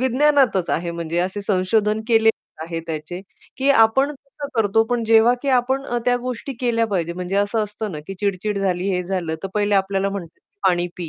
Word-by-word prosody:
विज्ञानातच 260 - +3
आहे 170 +1 -1
म्हणजे 170 0 -3
असे 185 +3 -1
संशोधन 210 +2 +1
केलेले 225 -1 +5 0.3
आहे 165 0 -4
त्याचे, 160 +2 -5 0.4
की 270 +1 0
आपण 265 +3 +4
कसं 280 +1 -10
करतो, 225 0 +3
पण 235 0 -1
जेव्हा 225 +1 +5
की 280 - -2
आपण 260 +1 +2 0.2
त्या 245 0 +3
गोष्टी 250 +2 -5
केल्या 230 -2 +1
पाहिजेत 170 -5 -2
म्हणजे 180 +2 -3
असं 205 +2 +1
असतं 210 0 -6
ना, 155 - -5
की 195 - -6
चिड-चिड 200 0 -1
झाली, 185 -1 0
हे 180 - -1
झालं 180 -3 -2
तर 195 - -3
पहिले 205 0 +1
आपल्याला 195 0 +1
म्हणतात, 175 -5 -7
की - - -57
"पाणी 175 -1 +1
पी, 175 -3 -5
205 Hz, 195 wpm, -21 LUFS, 180-235 Hz, 0.4 s, केलेले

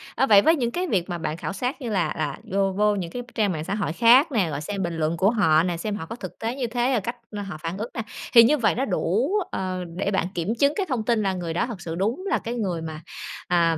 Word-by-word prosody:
Ờ, - - +3
vậy 205 -4 +8
với 320 +9 +5
những 240 -6 -1
cái 360 +5 -2
việc 190 - 0
mà 175 - -2
bạn 155 -1 -3
khảo - - -4
sát 250 +8 -3
như 245 - -3
là 195 -5 0
là 150 -3 -2
vô 195 0 +2
vô 210 +2 +2
những 175 -4 -4
cái 245 - -4
trang 210 -4 +2
mạng 155 -3 -3
xã 200 - -2
hội 200 -7 -2
khác 250 - +6
nè, 205 -10 +1
rồi 145 -1 -4
xem 195 +5 -3
bình 170 -1 -3
luận 160 +1 0
của 190 +4 +4
họ 160 -9 +4
nè, 175 -1 -1
xem 205 +4 -3
họ 160 - -5
có 230 - -7
thực - - -9
tế 230 +2 -2
như 260 -3 -2
thế, 240 +2 0
ờ, 240 - +3
cách 235 +5 -4 0.3
họ 180 - -6
phản 165 +3 -3
ứng 220 +4 -4
nè, 230 - -3 0.3
thì 235 -2 +10
như 295 +6 +4
vậy 220 -6 +2
nó 260 +4 0
đủ, 210 - 0 0.2
ờ, 185 -1 -3
để 200 +1 0
bạn 190 -3 +1
kiểm 180 +6 -1
chứng 280 +1 +4
cái 395 - 0
thông 250 -5 -1
tin, 230 -2 +2
là 195 -1 +1
người 175 -3 -4
đó 170 - +1
thật 220 -7 -7
sự 165 -1 -5
đúng 220 - -1
là - - +2
cái 235 - -4
người 185 -8 -2
mà, 160 -1 -6 0.5
à, 170 -2 +3
200 Hz, 290 wpm, -24 LUFS, 170-235 Hz, 0.5 s, thì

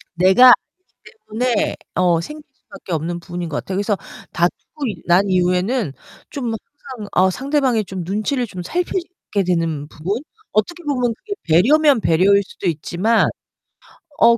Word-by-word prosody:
내가 190 +8 +6
알기 370 - +1 0.2
때문에 245 -4 +1 0.2
어 175 -2 +3
생길 300 - -8
수밖에 280 -9 -10
없는 165 +2 -2
부분인 175 0 -6
것 150 - -3
같아요. 190 - -4
그래서 205 0 0 0.4
다투고 175 - -2 0.2
난 180 +3 +3
이후에는 180 - +1 0.4
좀 250 -5 -3
항상 240 -2 -9
어 185 +1 +4
상대방의 260 -1 0
좀 185 -1 -5
눈치를 215 - -1
좀 185 -3 -7
살피게 350 - -2
되는 165 -5 -1
부분, 185 - -4 0.3
어떻게 340 +12 -1
보면 250 -6 0
그게 415 - -6
배려면 270 - +4
배려일 195 +5 +4
수도 190 0 -6
있지만 175 +8 +1 0.9
어 235 0 +6
200 Hz, 300 characters per minute, -20 LUFS, 175-255 Hz, 0.9 s, 내가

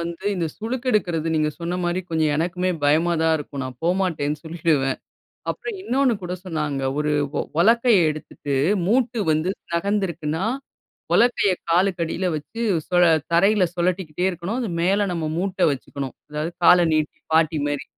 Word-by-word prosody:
வந்து 170 +2 -6
இந்த 175 -3 -1
சுளுக்கெடுக்கிறது 215 -9 -1
நீங்க 155 -1 +2
சொன்ன 170 +1 -2
மாரி 175 +1 0
கொஞ்சம் 160 -2 +1
எனக்குமே 180 +3 0
பயமா 160 +4 +3
தான் 160 0 +3
இருக்கும். 140 -1 -6
நான் 125 -1 -8
போமாட்டேன்னு 170 -5 0
சொல்லிடுவேன். 155 -5 0 0.5
அப்புறம் 455 -3 -5
இன்னொன்னு 265 -6 +2
கூட 180 0 -4
சொன்னாங்க. 150 -6 -2 0.2
ஒரு 150 0 0 0.2
உ - - +1 0.2
உலக்கைய 230 +3 +5
எடுத்துட்டு, 150 -1 -5 0.3
மூட்டு 240 +2 +1
வந்து 155 +4 +1 0.2
நகர்ந்துருக்குன்னா, 170 -3 -1 0.7
உலக்கைய 235 -4 +3 0.2
காலுக்கடியில 175 0 +1
வைச்சு 155 +10 -6 0.3
சுழ 180 0 +4 0.3
தரையில 195 +4 +4
சுழட்டிக்கிட்டே 180 -1 -1
இருக்கணும். 185 +6 -3
அது 230 - -2
மேல 195 +4 +2
நம்ம 165 -2 -2
மூட்ட 190 +1 -2
வைச்சுக்கணும். 135 -1 -5 0.2
அதாவது, 150 +3 -3
கால 180 - +8 0.2
நீட்டி 155 -1 -1
பாட்டி 160 -1 +3
மாரி. 145 -1 -3
170 Hz, 140 wpm, -23 LUFS, 155-195 Hz, 0.7 s, கால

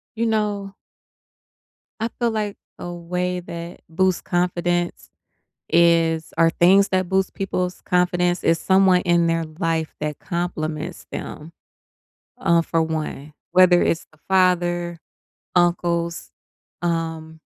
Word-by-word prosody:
You 230 +1 0
know 205 -3 -1 1.3
I 225 - 0
feel 235 -1 +1
like 210 -2 -3 0.2
a 175 - -5
way 180 +1 -3
that 170 0 -8
boosts 185 +2 +1
confidence 175 0 -1 0.6
is 165 -1 +3
or 165 0 +5
things 190 +4 +4
that 185 -1 +1
boost 190 0 +1
people's 180 -2 -3
confidence, 180 0 +1
is 165 0 +3
someone 190 -1 +4
in 175 -1 +2
their 165 0 0
life 165 -3 -1
that 150 -1 -3
compliments 165 -1 -4
them, 160 +3 -7 0.9
uh, 170 0 +3
for 165 0 0
one, 155 -2 -4 0.2
whether 180 -1 +6
it's 165 - 0
the 155 - -24
father, 175 -2 +2 0.6
uncles, 170 -1 +1 0.5
um, 165 -2 -3
175 Hz, 115 wpm, -22 LUFS, 165-185 Hz, 1.3 s, whether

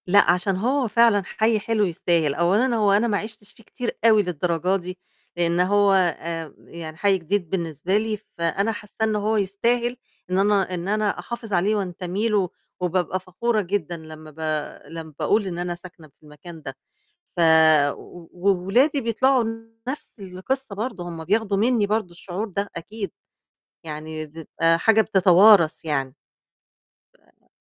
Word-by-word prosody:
لأ، 200 0 +5
عشان 180 +2 0
هو 250 +6 0
فعلًا 230 -2 +4
حي 220 +2 +1
حلو 215 0 +1
يستاهل، 165 -4 +1
أولًا 205 - +2
هو 210 -3 +3
أنا 210 +4 +3
ما 205 -3 +1
عِشتش 215 0 -8
فيه 225 - -20
كتير 245 +2 -5
أوي 215 -2 +6
للدرجة 180 +1 0
دي، 185 -1 -5 0.4
لأن 170 0 +1
هو 200 +2 +4
آآ، 170 -4 -1
يعني 160 -2 -10
حي 195 +2 +3
جديد 180 0 -2
بالنسبة 170 +1 -1
لي، 215 0 -1 0.2
فأنا 190 +6 0
حاسّة 210 -1 -10
إن 220 -1 +1
هو 215 +1 0
يستاهل 235 +5 0 0.3
إن 185 - 0
أنا 195 -2 +2
إن 175 0 -4
أنا 210 0 0
أحافظ 235 -3 -6
عليه 195 +4 +2
وانتمي 190 +2 -2
له 200 -4 +1 0.3
وبابقى 180 +1 -1
فخورة 210 +5 -1
جدًا 175 -3 -3
لمّا 155 -1 -11
ب 155 - -18 0.5
لمّا 160 0 -8
باقول 210 -1 +1
إن 175 -2 -4
أنا 175 0 -3
ساكنة 175 -2 -13
في 150 - -33
المكان 155 +2 -12
ده، 135 -2 -7 0.6
ف - - -1 0.9
وولادي 200 - +2
بيطلعوا 255 +2 +2 0.4
نَفْس 260 -4 -6
القصّة 200 +6 -4
برضه، 205 -5 -4
هُم 165 -2 -7
بياخدوا 205 +2 +1
مني 225 0 +2
برضه 210 -3 -1
الشعور 185 +5 -5
ده 200 +1 -3
أكيد، 205 +3 -5 0.7
يعني 155 0 -6
بتبقى 165 +2 0
حاجة 220 +5 +4
بتتوارَث 190 -4 +5
يعني. 135 -4 -2 1.3
آآ - - -36
195 Hz, 150 wpm, -23 LUFS, 170-215 Hz, 1.3 s, أوي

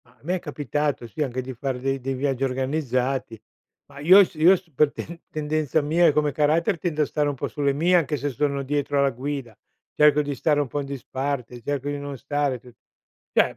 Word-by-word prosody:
Ma 115 - -23
a 125 - -33
me 175 +5 0
è - - -2
capitato, 145 -4 -2
sì, 150 - -6
anche 130 -3 -1
di 130 +1 -7
far 130 +1 -3
de 135 +1 -1
dei 135 +1 -3
viaggi 135 0 -1
organizzati, 130 -3 -1 0.5
ma 140 0 -14
io 185 +7 +8
s - - -6
io 165 +5 +6
s 180 -2 -11
per 145 +2 +3
ten 170 +1 -8
tendenza 155 -1 0
mia 165 +4 +3
e - - +6
come 150 0 +1
carattere, 160 +6 +2
tendo 155 -3 0
a - - 0
stare 150 0 0
un 145 - -3
po' - - -3
sulle 140 -1 0
mie. 170 +6 +3
Anche 155 -3 0
se 145 +1 -2
sono 140 +1 -1
dietro 145 +1 -1
alla 140 0 +3
guida, 130 -2 -5 0.4
cerco 150 0 +5
di 145 0 -3
stare 145 +1 +1
un 145 - 0
po' 145 - -3
in 140 - -4
disparte 130 -2 -4
cerco 145 +2 -2
di 145 - -2
non 140 -1 -6
stare 145 -1 -1
tu 125 +1 -16 0.6
cioè - - +3
145 Hz, 225 wpm, -24 LUFS, 135-150 Hz, 0.6 s, io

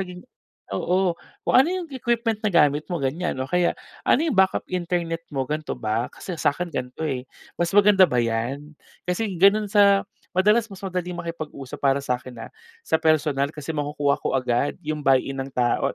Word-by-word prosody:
naging, 180 0 -7 0.5
oo, 185 -1 +1 0.3
kung - - -1
ano 265 +6 +6
yung 365 -3 -4
equipment 235 -3 -1
na - - +4
gamit 150 -3 +4
mo - - 0
ganyan, 150 +7 -1
o 130 - -3
kaya 180 +1 +2 0.4
ano 280 - +5
yung 300 -11 -1
backup 190 0 +3
internet 170 -2 -2
mo, 135 -1 -1
gan'to 155 +1 -3
ba, 110 +2 -2
kasi 180 -3 -7
sa'kin 170 +4 0
gan'to, 130 0 -5
eh, 130 -2 -3 0.4
mas 170 - +2
maganda 200 -2 +7
ba 125 - -1
'yan? 120 +6 -2 0.4
Kasi 190 +1 -1
ganun 205 +2 +5
sa 200 -1 +6 0.4
madalas 210 +4 +4
mas 195 - -10
madaling 180 -1 -3
makipag-usap, 155 -6 -7
para 140 0 +2
sa'kin, 125 -1 -3
ah, - - -13 0.3
sa 160 - +1
personal 150 -3 +2
kasi 155 +1 -6
makukuha 145 -1 0
ko - - 0
agad 125 +2 0
yung 155 0 -2
buy-in 135 -1 +2
ng 135 - -4
tao 120 -1 +2
160 Hz, 175 wpm, -24 LUFS, 140-190 Hz, 0.5 s, maganda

